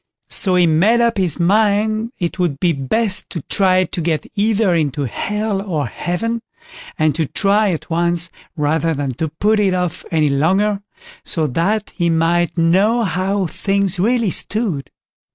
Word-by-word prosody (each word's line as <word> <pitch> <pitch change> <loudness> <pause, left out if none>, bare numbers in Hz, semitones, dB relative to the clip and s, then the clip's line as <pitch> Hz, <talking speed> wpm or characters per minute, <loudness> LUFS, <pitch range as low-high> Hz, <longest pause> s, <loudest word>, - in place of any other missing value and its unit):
So 185 -2 +2
he 180 -1 +4
made 180 +9 +3
up 235 -3 +1
his 180 -3 +1
mind 215 +4 +1
it 175 +1 -4
would 165 -6 -1
be 175 -2 +2
best 185 - +1
to 165 -6 -6
try 185 -2 +2
to 180 - -5
get 160 -1 -1
either 210 -2 +1
into 145 -4 -1
Hell 210 - -2
or 165 -8 -2
Heaven, 225 - -3 0.6
and 155 -1 +2
to 160 0 -1
try 205 +5 +2
at 165 - -5
once, 170 0 0 0.3
rather 160 +2 0
than 140 -1 -2
to 160 - 0
put 210 +8 0
it 195 -3 +2
off 180 -1 -3
any 155 -3 +1
longer, 190 +9 +1 0.4
so 160 -2 0
that 190 - -1
he 170 -2 -1
might 170 +2 +1
know 195 +8 +3
how 195 0 -1
things 195 +2 -1
really 230 0 +1
stood. 200 - 0
180 Hz, 160 wpm, -18 LUFS, 165-210 Hz, 0.6 s, he